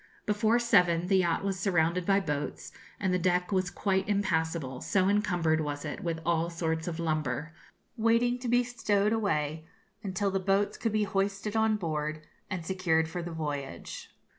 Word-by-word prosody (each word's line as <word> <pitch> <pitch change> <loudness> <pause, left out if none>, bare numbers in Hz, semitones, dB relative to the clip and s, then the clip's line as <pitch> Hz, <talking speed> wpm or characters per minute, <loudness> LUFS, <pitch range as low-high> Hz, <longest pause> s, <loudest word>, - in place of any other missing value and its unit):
Before 215 +2 +2
seven 180 -8 +3
the 190 +1 +3
yacht 175 -1 +1
was 195 -1 -1
surrounded 175 -2 +1
by 195 0 +4
boats, 150 -5 -4 0.3
and 190 -3 0
the 180 - +2
deck 180 +1 +1
was 185 -2 +1
quite 190 +1 0
impassable, 160 -9 0
so 190 -1 +2
encumbered 175 -6 +2
was 145 0 -4
it 150 - -5
with 165 -2 -2
all 170 0 +1
sorts 160 -1 -2
of 170 -1 -3
lumber, 155 -2 -2 0.4
waiting 230 +2 +2
to 250 - -5
be 245 +1 +4
stowed 215 -3 +1
away, 155 -8 0 0.4
until 195 -1 -1
the 195 - 0
boats 195 +2 +1
could 225 - -1
be 215 0 +2
hoisted 195 +1 -1
on 220 0 +3
board 155 -3 -3 0.3
and 180 -4 -4
secured 165 -3 +1
for 175 +2 -4
the 170 - -5
voyage. 145 -4 -5
180 Hz, 170 wpm, -29 LUFS, 160-205 Hz, 0.4 s, by